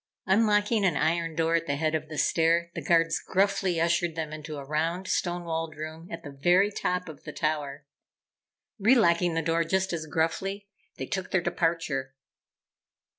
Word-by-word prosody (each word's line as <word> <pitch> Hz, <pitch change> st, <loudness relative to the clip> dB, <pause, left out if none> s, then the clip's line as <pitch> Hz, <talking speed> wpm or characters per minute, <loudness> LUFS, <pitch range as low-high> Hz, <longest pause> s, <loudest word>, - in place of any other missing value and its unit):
Unlocking 210 Hz, +2 st, +3 dB
an 175 Hz, -6 st, +2 dB
iron 165 Hz, +1 st, 0 dB
door 165 Hz, +1 st, +1 dB
at 165 Hz, 0 st, +1 dB
the 140 Hz, -, 0 dB
head 155 Hz, +2 st, 0 dB
of 155 Hz, -1 st, -2 dB
the 155 Hz, -, -6 dB
stair, 170 Hz, +2 st, +2 dB
the 170 Hz, -, -5 dB
Guards 165 Hz, +1 st, +3 dB
gruffly 195 Hz, -2 st, +1 dB
ushered 170 Hz, 0 st, +1 dB
them 155 Hz, -2 st, -4 dB
into 155 Hz, 0 st, -7 dB
a 140 Hz, -, -7 dB
round, 165 Hz, +5 st, -1 dB
stone 175 Hz, -1 st, -1 dB
walled 165 Hz, -1 st, -3 dB
room 155 Hz, +2 st, -7 dB
at 165 Hz, 0 st, -6 dB
the 145 Hz, -, -8 dB
very 175 Hz, +9 st, +3 dB
top 180 Hz, -2 st, -2 dB
of 155 Hz, -3 st, -10 dB
the -, -, -7 dB
tower. 150 Hz, -2 st, -2 dB, 0.9 s
Relocking 180 Hz, -7 st, +4 dB
the 165 Hz, -, 0 dB
door 165 Hz, +1 st, +1 dB
just 190 Hz, +2 st, 0 dB
as 160 Hz, -2 st, -4 dB
gruffly, 195 Hz, +6 st, -1 dB, 0.3 s
they -, -, -4 dB
took 190 Hz, -1 st, -4 dB
their 190 Hz, -, +2 dB
departure. 165 Hz, -6 st, -1 dB
165 Hz, 175 wpm, -27 LUFS, 155-180 Hz, 0.9 s, Relocking